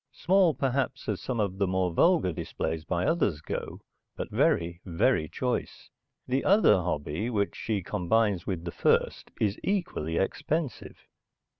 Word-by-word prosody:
Small, 180 -1 +3
perhaps, 135 -1 -1
as 105 -3 -2
some 125 -3 -3
of 100 -2 -1
the 100 - +2
more 90 -1 0
vulgar 165 - +3
displays 80 0 -4
by 85 +1 -1
others 160 - +1
go, 80 - -5 0.3
but - - -5
very, 85 +1 +1
very 80 -3 +1
choice. - - -3 0.3
The 130 +2 0
other 205 +3 +5
hobby, 85 +3 -2
which 100 -4 -1
she 105 -4 -2
combines 100 0 0
with 90 -3 -3
the 85 - -3
first, - - +1
is 105 -2 0
equally 125 - -1
expensive. 145 +7 -2
100 Hz, 145 wpm, -28 LUFS, 85-130 Hz, 0.3 s, other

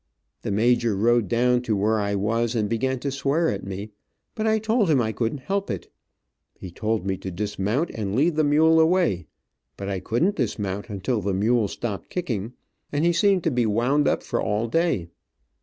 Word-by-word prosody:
The - - -4
major 115 +1 +2
rode 115 +1 +2
down 125 +3 +2
to 115 -3 -1
where 105 +2 +1
I 100 0 -1
was 115 +4 0
and 110 -2 +1
began 130 +4 -1
to 140 - -2
swear 140 +5 +1
at 100 - -3
me, 100 +2 -6 0.4
but 220 0 -2
I 220 0 +3
told 220 -2 +1
him 145 -4 +4
I 110 -2 0
couldn't 115 +5 -2
help 195 +6 -2
it. - - -5 0.6
He 90 - -9
told 110 +2 -2
me 95 -1 -1
to 95 - -6
dismount 105 - -2
and 105 -2 -3
lead 155 +5 +2
the 155 - +2
mule 160 +2 +4
away, 160 - +2 0.5
but 100 0 -5
I 95 -1 -2
couldn't 120 - 0
dismount 100 -4 -2
until 105 +3 -2
the 100 0 -1
mule 110 +2 +2
stopped 100 -3 -5
kicking, 120 - -3 0.4
and 145 +3 0
he 175 - +3
seemed 190 0 +3
to 165 - +1
be 120 -3 +1
wound 125 +7 +2
up - - +1
for - - -2
all 105 +3 0
day. 165 - 0
115 Hz, 195 wpm, -24 LUFS, 100-150 Hz, 0.6 s, him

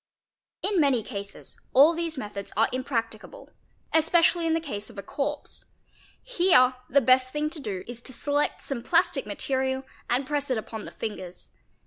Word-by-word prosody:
In 395 -2 +2
many 265 -6 +3
cases 200 0 -7
all 290 +6 +8
these 330 -2 0
methods 205 -4 -6
are 225 - +4
impracticable, 230 -4 -4 0.4
especially 330 +1 +4
in 325 - +2
the - - +1
case 215 -10 -6
of 220 - -14
a 200 - -5
corpse; 290 +7 -4 0.6
here 350 - +4 0.2
the 280 +2 +4
best 255 +1 +4
thing 300 +1 -1
to 325 - -5
do 200 -9 -4
is 240 0 -8
to 260 - -2
select 290 +3 0
some 270 -4 -3
plastic - - +2
material 265 0 -1 0.3
and 250 +3 +1
press 285 0 -1
it 255 - +1
upon 220 0 -6
the - - -8
fingers. 185 -5 -7
265 Hz, 165 wpm, -26 LUFS, 225-300 Hz, 0.6 s, all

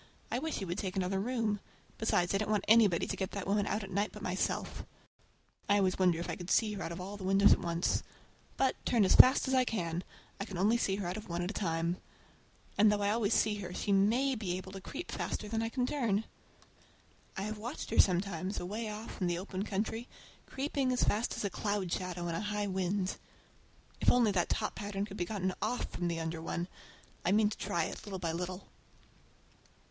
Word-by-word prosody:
I 245 - +1
wish 320 +3 -2
he 195 - -3
would 175 +3 -3
take 190 -2 -3
another 190 0 0
room! 220 -2 0 0.4
Besides, 180 -5 +2
I 195 - +2
don't 215 - -2
want 210 -2 +1
anybody 215 -6 +5
to - - -3
get 190 -1 -2
that 200 -2 -3
woman 200 +1 +1
out 210 - -1
at 195 - -8
night 200 +3 0
but 210 - -10
myself. 185 0 -2 0.9
I 205 - +5
often 190 -2 +2
wonder 180 -3 +4
if 170 - -4
I - - -2
could 175 0 -8
see 215 +1 +3
her 200 - -5
out 170 - -3
of 170 - -5
all 195 +3 -6
the 195 - -8
windows 195 +2 +6
at - - +1
once. 170 0 0 0.6
But, 265 -1 +1
turn 225 -5 +3
as - - +4
fast 260 +2 +8
as 265 - 0
I 260 -1 +5
can, 175 -7 -2 0.4
I 200 - -2
can 195 -4 -6
only 210 +6 +4
see 195 -4 0
out 185 -1 -3
of 215 - -8
one 170 +1 -1
at 180 - -2
one - - -8
time. 170 -2 -1 0.8
And 210 0 +7
though 205 -1 +1
I 200 - +2
always 220 -2 +2
see 215 -1 +2
her 180 -3 -6
she 205 - -1
may 225 +8 +3
be 195 -7 -2
able 190 0 -8
to 195 0 -8
creep 330 - -6
faster 210 - -3
than 225 +1 -1
I 225 - -1
can 250 +1 0
turn! 230 -7 0 1.1
I 190 - -2
have 215 +1 -4
watched 240 +7 -5
her - - +2
sometimes 185 0 +2
away 215 +5 -3
off 210 0 -7
in 180 - +2
the 175 -1 0
open 185 +1 -4
country, 220 +4 -2 0.4
creeping 275 -1 -1
as 250 - +2
fast 220 +3 +1
as - - -3
a 200 - -1
cloud 205 -4 -1
shadow 180 -2 -3
in 170 - -2
a 165 - -2
high 210 0 -1
wind. 190 0 -1 0.8
If - - +5
only 240 -4 +4
that 180 -3 +1
top - - -1
pattern 205 -1 -3
could 205 -1 -9
be 175 - 0
gotten 190 -2 -1
off 250 - -1
from 175 - -2
the 170 -1 -1
under 160 0 -3
one! 170 +1 -3 0.6
I 180 - +2
mean 210 +1 +4
to - - -5
try 170 - 0
it, - - -5
little 200 -2 -5
by 170 -3 -2
little. 180 +3 -4
200 Hz, 225 wpm, -32 LUFS, 180-215 Hz, 1.1 s, fast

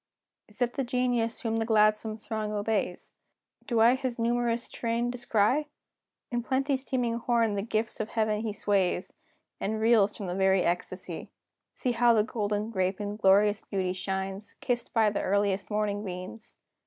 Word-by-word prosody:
Is 210 +4 -2
it 245 0 -1
the 275 - -1
genius 245 -2 0
whom 225 -2 -1
the 225 - +1
gladsome 215 0 +3
throng 215 -1 -4
obeys? 205 -3 -2 0.5
Do 230 -3 +2
I 235 +2 +7
his 260 -2 -2
numerous 235 0 0
train 235 +1 -1
descry? 245 +4 +1 0.6
In 240 -1 0
plenty's 265 +2 0
teeming 240 -3 -1
horn 230 -2 +2
the 200 - -1
gifts 220 +1 -2
of 215 - -2
heaven 215 -2 0
he 220 -1 -2
sways, 195 -3 0 0.5
And 215 +2 -2
reels 220 -2 +4
from 180 -3 -4
very 190 -1 +4
ecstacy! 175 +1 -3 0.4
See 250 - -1
how 235 0 +4
the 215 - +4
golden 210 0 -2
grape 185 -1 0
in 205 0 -3
glorious 205 +1 +4
beauty 185 -2 -2
shines, 190 +2 -4
Kissed 240 -2 -2
by 220 -3 +3
the 205 - -1
earliest 200 0 0
morning 210 -1 -1
beams! 185 +4 -7
215 Hz, 160 wpm, -28 LUFS, 205-235 Hz, 0.6 s, I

